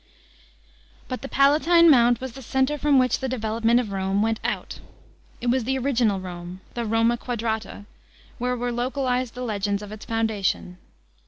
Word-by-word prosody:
§ - - -35
6. - - -33 1.0
But 255 - -4
the 275 - -7
Palatine 315 +5 +5
Mount 240 -5 +5
was 260 -1 -5
the 270 +3 -11
centre 265 +4 0
from 290 -1 +3
which 255 -1 +2
the 265 - -3
de 260 - -2
velopment 225 +2 +2
of 225 -5 -3
Rome 195 +1 0
went 225 0 0
our. - - -2 0.7
It 240 - 0
was 255 -2 0
the 265 +2 0
original 240 -6 +1
Rome, 180 0 -8
the 235 -1 -3
Roma 225 +2 +2
quadrata, 225 -3 -4 0.5
where 250 +1 -1
were 245 0 -2
localised 250 0 -1
the 250 - -5
legends 205 -3 -2
of 205 - -9
its 215 0 -9
foundation. 210 -5 -1
235 Hz, 180 wpm, -24 LUFS, 215-260 Hz, 1.0 s, Palatine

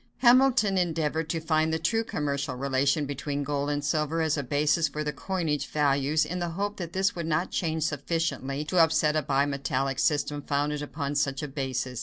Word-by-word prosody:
Hamilton 245 -5 +4
endeavored 160 -2 -1
to 165 - -1
find 160 0 +1
the 160 - +1
true 225 +8 0
commercial 140 - -2
relation 140 +2 +1
between 145 +1 -3
gold 145 0 -2
and 145 0 -2
silver 155 +1 0
as 155 -1 +1
a 145 - -1
basis 145 +4 +1
for 150 +1 -4
the 150 0 -2
coinage 160 -7 -2
values, 145 +1 +2
in 180 +2 -4
the 175 -1 -2
hope 205 +1 -2
that 170 -3 -6
this 190 +1 +1
would 170 -2 -4
not 165 +3 0
change 160 -2 -1
sufficiently 145 -2 -2
to 180 +3 +1
upset 160 -2 +4
a 155 - +2
bimetallic 135 -1 0
system 145 -1 +1
founded 145 +1 -1
upon 145 -1 -4
such 140 -1 0
a - - -2
basis. 130 -3 -3
150 Hz, 190 wpm, -27 LUFS, 140-165 Hz, -, Hamilton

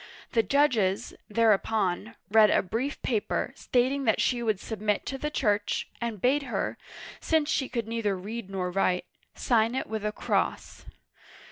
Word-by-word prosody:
The 230 - +4
judges, 220 -5 +2 0.2
tTiereupon, 215 -3 +1 0.2
read 215 -1 +7
a - - +3
brief 245 +9 -3
paper, 220 -5 -1
stating 260 +3 +1
that 220 - +3
she 245 -2 +1
would 215 -4 0
submit 210 -1 -2
to 270 - -4
the 300 - -2
Church, 210 -8 0
and 230 -3 -3
bade 265 +7 +3
her 275 - -3 0.2
— - - -11
since 315 -1 +1
she 265 - 0
could 235 -3 -3
neither 225 -4 -1
read 210 +2 -6
nor 185 -2 -2
write 180 -1 +1 0.2
— - - -50
sign 230 -1 +2
it 265 - -1
with 220 -1 -4
a 210 - 0
cross. - - -2
225 Hz, 165 wpm, -28 LUFS, 205-250 Hz, 0.2 s, read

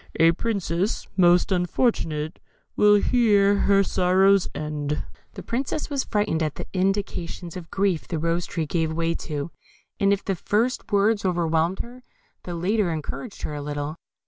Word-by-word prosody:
A 165 0 +7
Princess, 190 -1 -2
most 180 +1 +4
unfortunate, 175 -5 0 0.4
Will 210 0 +6
here 205 -2 +4
her 200 0 +3
sorrows 190 +1 +3
end. 150 -1 -3 0.3
The - - -7
Princess 270 +5 -3
was 275 -2 -1
frightened 205 -6 0
at 155 -2 -1
the - - -6
indications 185 -3 -2
of 175 -3 -8
grief 190 -4 0
the 165 - -2
Rose 170 +2 -1
tree 165 -2 -2
gave 160 +1 -1
way 165 +1 0
to, 150 -1 -5 0.5
and 200 0 +3
if 200 -1 0
the 195 - 0
first 220 +7 -1
words 205 +1 +3
overwhelmed 170 -1 +1
her, 245 +2 -10 0.4
the 175 - -4
latter 195 +3 +1
encouraged 165 +8 -6
her - - -3
a 145 - -4
little. 145 +1 -4
180 Hz, 155 wpm, -24 LUFS, 165-205 Hz, 0.5 s, A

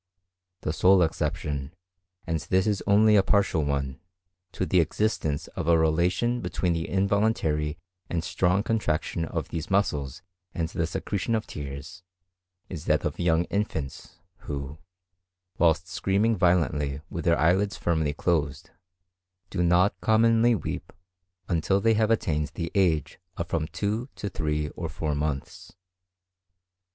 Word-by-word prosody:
The 75 - -2
sole 90 +2 +5
exception, 75 -2 -2 0.5
and 80 -1 -1
this 95 +6 +1
is 105 -3 0
only 105 +1 +5
a 100 - +7
partial 95 -5 +2
one, 70 -2 -2 0.5
to 95 - -1
the 90 +2 +3
existence 80 -3 0
of - - -5
a 85 -1 +5
relation 90 +10 +1
between 90 -6 -1
the 80 0 -3
involuntary 95 -7 +1 0.3
and 85 -2 -1
strong 90 +3 +1
contraction 85 -7 -1
of - - -4
these 80 -2 -5
muscles 75 -9 0 0.3
and 85 -2 -1
the 85 -1 -1
secretion 100 +5 -2
of 110 - -2
tears 70 +3 -7 0.7
is 80 -5 -7
that - - +2
of - - -3
young 85 -1 +3
infants, 80 -7 -3 0.3
who, 70 +1 -5 0.8
whilst 85 0 +3
screaming 105 +4 +1
violently 75 -6 +1
with 85 - -4
their 85 -1 +4
eyelids 95 +7 +2
firmly 80 -3 0
closed, 75 -1 -1 0.8
do 90 - -1
not 90 +2 +3
commonly 115 +3 +4
weep 100 - -5 0.6
until 90 +3 +1
they 115 +3 +3
have 110 0 +2
attained 75 -9 +1
the 85 -1 -3
age 85 -7 +1 0.2
of 85 - -3
from 80 -2 -1
two 105 - -2
to 100 - -4
three 75 -3 -2
or 85 +2 -5
four 75 +2 -2
months. 75 -1 -4
85 Hz, 140 wpm, -26 LUFS, 75-100 Hz, 0.8 s, a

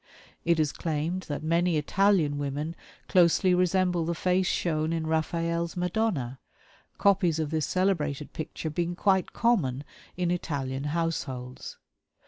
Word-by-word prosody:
It 170 -1 +3
is 155 -2 +2
claimed 165 +3 -3
that 145 +1 -3
many 170 +1 +2
Italian 160 -2 +2
women 145 +3 -3 0.3
closely 180 +1 +4
resemble 180 -1 +2
the 170 +1 -1
face 180 +2 +1
shown 155 -2 0
in 165 -1 -1
Raphael's 170 +2 -1
"Madonna," 175 - -1 0.6
copies 185 -5 +3
of 155 -2 -2
this 155 -2 0
celebrated 155 -7 0
picture 160 0 -5
being 175 +2 -1
quite 190 0 +2
common 155 - +1 0.3
in 175 -1 0
Italian 140 -6 -2
households. 145 -6 -3
165 Hz, 125 wpm, -28 LUFS, 150-180 Hz, 0.6 s, closely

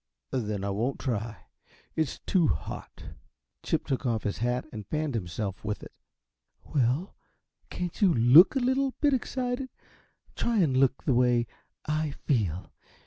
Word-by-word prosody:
"Then 105 -5 -2
I 100 - -1
won't 115 +7 -1
try. 115 -4 -3 0.5
It's 160 -4 -1
too 175 -5 +3
hot." - - -5 0.5
Chip - - -1
took 135 - -2
off 115 -4 0
his 105 - -2
hat 125 +2 0
and 105 -3 -7
fanned 155 -2 -2
himself 95 -1 -4
with 105 -1 -3
it. - - -11 0.8
"Well, 135 +7 +1 0.5
can't 180 +2 -5
you 195 -3 +6
LOOK 140 - +7
a - - +3
little 260 +1 +1
bit 290 -2 +3
excited? 255 0 -2 0.7
Try 235 -1 0
and 155 -10 +3
look 135 0 +2
the 135 - +2
way 120 -1 +3 0.4
I 155 -1 -1
feel! 100 - -1
130 Hz, 145 wpm, -28 LUFS, 110-175 Hz, 0.8 s, LOOK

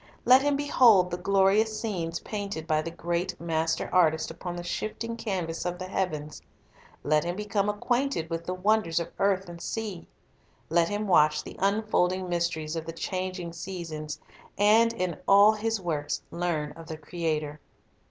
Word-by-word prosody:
Let 255 +2 +7
him 290 0 +2
behold 240 -10 +5
the 175 - -2
glorious 200 +3 +3
scenes 170 -7 -3
painted 200 -6 -5
by 155 -1 +1
the 165 - -5
great 170 +1 -3
Master 160 -1 -1
Artist 160 -3 +3
upon 175 +1 -6
the 175 - -5
shifting 225 +5 -4
canvas 185 -7 -3
of 180 0 -3
the 185 - -5
heavens, 155 -6 -3 0.6
let 150 +2 +2
him 175 +1 -2
become 210 0 -1
acquainted 245 - 0
with 165 0 -4
the 180 - -1
wonders 195 -3 +2
of 170 - -5
earth 195 -1 +2
and 170 -1 -9
sea, 210 -6 -4 0.6
let 170 0 +3
him 205 +1 -2
watch 150 -4 +4
the - - -9
unfolding 195 -2 +1
mysteries 170 -3 -1
of 160 0 -4
the 165 - -4
changing 185 0 -4
seasons, 160 -4 -6 0.4
and, 220 +3 +5
in 185 -7 -3
all 200 +2 +7
His 220 0 -1
works, 150 -5 -2
learn 165 -4 -2
of 165 -1 -12
the 160 -2 -6
Creator. 155 -2 -3
180 Hz, 160 wpm, -27 LUFS, 165-205 Hz, 0.6 s, Let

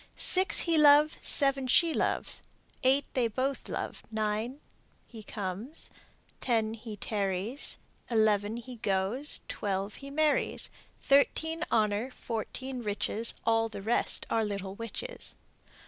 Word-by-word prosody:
Six 375 0 +4
he 330 -2 +2
loves, 300 +1 +6
Seven 275 -2 +2
she 330 +6 +5
loves, - - 0 0.4
Eight 270 +2 +3
they 250 -3 +2
both 260 +5 -2
love, - - -4
Nine 220 +4 -2 0.5
he 225 -2 -11
comes, 210 - -6 0.5
Ten 225 -3 0
he 220 -1 -8
tarries, 200 +4 -1 0.3
Eleven 215 -1 +2
he 245 +1 -9
goes, 210 +8 0
Twelve 200 0 -3
he 275 - -8
marries. 305 +1 +1 0.3
Thirteen 320 +4 +2
honor, 215 +2 +1
Fourteen 250 +2 -5
riches, 215 +1 +1
All 225 0 +2
the 200 -3 -8
rest 230 +3 0
are 225 - +2
little 200 -2 -4
witches. 230 - -6
230 Hz, 120 wpm, -30 LUFS, 210-275 Hz, 0.5 s, loves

